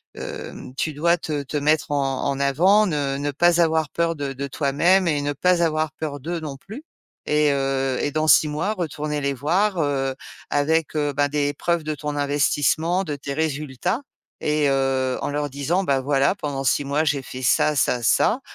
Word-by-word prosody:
hem, 130 - -8
tu 155 - -1
dois 170 +4 +2
te 150 -3 -3
te 145 - -8
mettre 150 +1 +1
en 135 -2 -1
en 140 - -1
avant 180 +10 +4
ne 145 -4 -1
ne 145 +1 -2
pas 175 +4 +3
avoir 160 -2 +1
peur 170 0 0
de 140 -1 -3
de 140 +1 -5
toi-même 165 +7 +2
et 150 -3 +1
ne 145 0 -1
pas 180 +4 +2
avoir 155 -1 0
peur 150 -2 -5
d'eux 165 +4 -4
non 145 -3 -6
plus 215 - -10 0.4
et 150 -1 +3
heu 135 -1 0
et 145 - 0
dans 155 +1 0
6 155 - +6
mois 160 +8 -1
retourner 150 -5 -3
les 140 0 0
voir, 175 +8 0
heu, 135 -2 0 0.4
avec, 160 +2 +1
heu, 145 -1 0
ben 145 +1 +2
des 145 0 0
preuves 170 +1 0
de 155 0 -3
ton 150 0 -4
investissement, 145 +5 +1
de 150 -5 -4
tes 140 0 -6
résultats 150 - -2 0.4
et 150 -1 +1
heu, 135 -1 0
en - - -1
leur 145 0 -2
disant, 145 +8 -1
ben: 135 -6 +1
«Voilà, 140 +5 +2
pendant 145 -7 -4
6 140 +2 +1
mois 145 +3 +1
j'ai 140 -3 0
fait 130 - -8
ça, 150 +5 +3
ça, 125 -3 +1
ça, 225 - +3
145 Hz, 195 wpm, -23 LUFS, 140-160 Hz, 0.4 s, 6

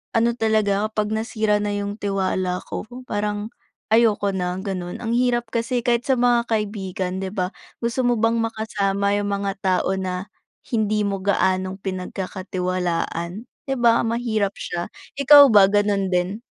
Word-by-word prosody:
Ano 230 +1 +3
talaga 215 -3 +1
ako - - 0
kapag 210 -1 0
nasira 220 -1 0
na 205 - -1
yung 205 0 -3
tiwala 185 -2 -1
ko - - -5 0.2
parang, 210 +1 -2 0.4
ayoko 215 -3 +3
na 180 -1 -2
ganun, 180 -3 -4
ang 225 - -2
hirap 240 -1 +1
kasi 235 +1 0
kahit 240 0 +2
sa 265 - +5
mga 240 -1 +3
kaibigan 190 -4 -2
'di 190 - -3
ba 185 -1 -1 0.3
gusto 235 +2 -1
mo 245 -1 +2
bang 225 +1 +2
makasama 205 -3 -1
yung 205 0 -1
mga 200 -1 -1
tao 185 0 +1
na, 185 0 -3 0.5
hindi 215 -2 +1
mo 195 -1 -3
gaanong 190 -1 +1
pinagkakatiwalaan, 185 0 -3 0.2
'di 270 - 0
ba 235 -1 +4
mahirap 220 -4 0
siya, 175 0 -4 0.3
ikaw 285 0 +9
ba 195 -2 +8
ganun 205 -2 +1
din? 180 +4 0
205 Hz, 150 wpm, -22 LUFS, 190-225 Hz, 0.5 s, ikaw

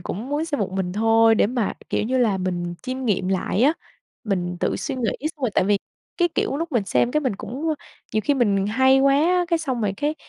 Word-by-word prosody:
cũng 215 +8 -5
muốn 295 +2 -1
xem 290 -8 -3
một 190 - -1
mình 185 -2 -2
thôi 225 +1 +4
để 215 - +3
mà, 235 -3 -1 0.2
kiểu - - 0
như 255 +3 0
là, 210 -6 +2
mình 175 -1 -3
chiêm 255 0 -4
nghiệm 190 -4 0
lại 195 +3 0
á. 295 +4 +5 0.5
Mình 180 -4 -2
tự - - 0
suy 275 - -3
nghĩ 240 -4 -1 0.3
xong - - -25
rồi, 250 - +1
tại - - +3
vì, 205 0 +2 0.4
cái 350 -1 +3
kiểu, 275 - 0
lúc 330 0 -4
mình 225 -5 +1
xem, 240 - +1
cái, 305 - +1
mình 250 -9 -1
cũng 270 +11 -5
à, - - -21 0.3
nhiều 215 - +2
khi 290 - +2
mình 200 -6 +2
hay 260 +4 +4
quá 275 0 +4
á, 355 +4 +3
cái 335 -2 +2
xong 260 -7 -2
rồi 200 -2 0
cái, 295 +6 -1
235 Hz, 250 wpm, -23 LUFS, 200-275 Hz, 0.5 s, á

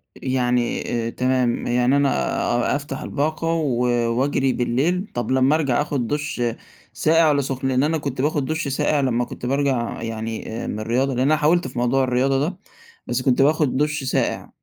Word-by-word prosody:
يعني 125 -2 0 0.3
تمام، 125 -1 0
يعني 125 +3 +2
أنا 140 -1 +3 0.6
أ - - +1
أفتح 140 -1 -5
الباقة 155 +3 -2
و 155 -7 0 0.3
وأجري 135 +1 +1
بالليل، 150 - 0
طب 120 +1 -2
لمّا 130 +3 +4
أرجَع 145 -5 +1
آخُد 140 -5 -2
دُش 145 -1 -3 0.5
ساقع 165 +1 +3
والّا 145 -1 +2
سُخن؟ 135 -1 -3
لأن 130 0 +2
أنا 160 +2 +1
كنت 140 -4 -3
باخد 145 -1 0
دُش 155 +1 -2
ساقع 145 +2 +1
لمّا 125 -3 +1
كنت 120 - -8
بارجع 135 -2 0
يعني 115 -1 -4 0.3
من 105 - -4
الرياضة، 125 +5 0
لأن 125 - -2
أنا 155 - +4
حاولت 155 +1 +2
في 125 -1 -5
موضوع 125 +2 +2
الرياضة 130 +2 +1
ده، 170 +6 -2 0.5
بس 120 +1 -1
كنت 130 0 +2
باخد 145 -2 +2
دُش 150 0 0
ساقع، 130 - -1
135 Hz, 170 wpm, -22 LUFS, 125-150 Hz, 0.6 s, لمّا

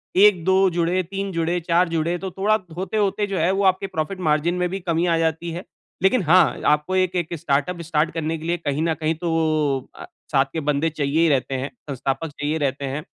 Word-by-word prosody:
1-2 190 -1 +5
जुड़े, 175 +1 0
3 195 +2 -4
जुड़े, 170 +1 0
4 170 +1 +2
जुड़े 165 +1 0
तो 190 +1 -6
थोड़ा 210 +4 +2 0.2
होते-होते 205 +1 0
जो 195 -2 -3
है, 170 +3 +2
वो 195 +1 0
आपके 190 +1 +2
प्रॉफिट 160 +5 -2
मार्जिन 155 +4 +1
में 180 0 0
भी 195 +2 -4
कमी 170 -1 0
आ 165 -1 +2
जाती 165 +1 -1
है। 175 +3 -6 0.4
लेकिन 195 +2 +3
हाँ, 170 +2 +4
आपको 150 +5 +2
एक-एक 180 -3 0
स्टार्टअप 145 +6 -1
स्टार्ट 160 0 0
करने 160 0 -2
के 155 - -9
लिए 175 - +1
कहीं 150 -2 -2
न 165 -1 +1
कहीं 160 0 -1
तो 165 +1 -3
वो 155 -4 +1 0.2
अ, - - -9 0.3
साथ 135 -1 +4
के 160 - -1
बन्दे 150 +3 0
चाहिए 150 -1 -1
ही 165 - +4
रहते 135 -1 0
हैं, 130 +2 -3 0.2
संस्थापक 135 +3 -2
चाहिए 145 +2 -2
रहते 140 -2 -2
हैं। 150 +1 -4
165 Hz, 215 wpm, -22 LUFS, 155-185 Hz, 0.4 s, 1-2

